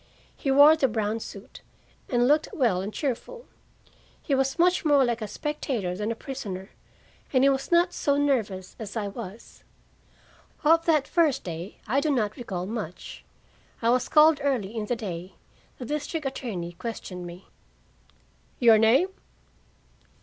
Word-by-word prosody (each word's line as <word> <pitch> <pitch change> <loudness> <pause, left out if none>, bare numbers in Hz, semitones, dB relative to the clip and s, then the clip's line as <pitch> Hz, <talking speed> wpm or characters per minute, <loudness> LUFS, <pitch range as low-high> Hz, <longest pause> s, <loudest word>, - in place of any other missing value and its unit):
He 275 - -3
wore 285 +3 +8
the 285 -4 +2
brown 220 -1 -1
suit, 200 -2 -10 0.5
and 245 -1 +2
looked 300 +2 +3
well 225 - +1
and 200 +2 -4
cheerful. 305 - -4 0.7
He 285 - -3
was 270 +1 +1
much 355 +1 +3
more 290 -4 +4
like 240 -1 -1
a 215 - -3
spectator 240 -10 -3
than 210 +3 -2
a - - -3
prisoner, 205 -7 -7 0.6
and 260 -1 +3
he 275 - +6
was 270 +4 -3
not 345 +1 +4
so 285 -1 +1
nervous 220 -10 -1
as 220 0 -6
I 210 -2 -2
was. 210 0 -10 1.0
Of 330 +2 +4
that 305 -4 +3
first 320 -6 +2
day 170 +3 -7
I 255 +5 +1
do 305 - 0
not 215 -7 0
recall 190 -7 -5
much. 205 -5 -6 0.6
I 230 0 +2
was 250 0 +1
called 305 0 +6
early 235 -7 -1
in 215 -2 -3
the 245 - 0
day. 185 -5 -6 0.4
The 250 - -7
district 300 +3 -3
attorney 215 -10 -4
questioned 180 -3 -6
me. 175 +2 -12 1.1
"Your 230 -3 +6
name?" 245 - +4
240 Hz, 155 wpm, -26 LUFS, 205-285 Hz, 1.1 s, wore